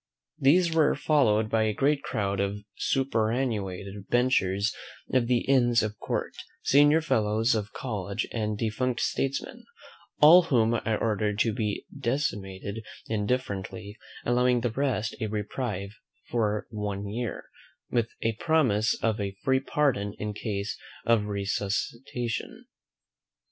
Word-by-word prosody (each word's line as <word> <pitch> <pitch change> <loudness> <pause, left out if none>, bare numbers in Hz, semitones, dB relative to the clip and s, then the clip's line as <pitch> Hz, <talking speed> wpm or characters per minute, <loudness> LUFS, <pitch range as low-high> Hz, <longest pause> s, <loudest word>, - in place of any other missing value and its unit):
These 165 +5 +4
were 155 -2 +4
followed 110 -8 +3
by 110 0 +1
a 110 -1 +1
great 140 +3 +2
crowd 100 -7 -2
of 100 +1 -2
superannuated 110 -6 -1
benchers 110 -5 +2 0.4
of 125 -3 +3
the 125 -1 +2
Inns 120 -4 +3
of 105 -1 -4
Court, - - -2 0.3
senior 145 +3 +5
fellows 110 -4 +2
of 105 -2 -2
colleges, 100 -6 -3
and 105 -2 -1
defunct 120 +3 -1
statesmen: 135 0 -2 0.6
all 165 +5 +9
whom 115 -7 +3
I 110 -1 0
ordered 105 -2 0
to 115 - +2
be 105 -3 -2
decimated 110 -6 -3 0.2
indifferently, 105 -2 -3 0.3
allowing 125 0 +3
the 120 -1 0
rest 125 -4 -1
a 110 - 0
reprieve 105 -1 -3 0.4
for 105 -3 0
one 105 -2 -3
year, 115 +1 -4 0.5
with 120 -1 +1
a 115 - +1
promise 125 -10 +2
of 110 -1 +1
a 100 -1 -4
free 130 0 +3
pardon 130 -8 0
in 105 0 -3
case 100 -1 -4 0.3
of 115 -3 +3
resuscitation. 115 - -3
110 Hz, 125 wpm, -27 LUFS, 105-130 Hz, 0.6 s, all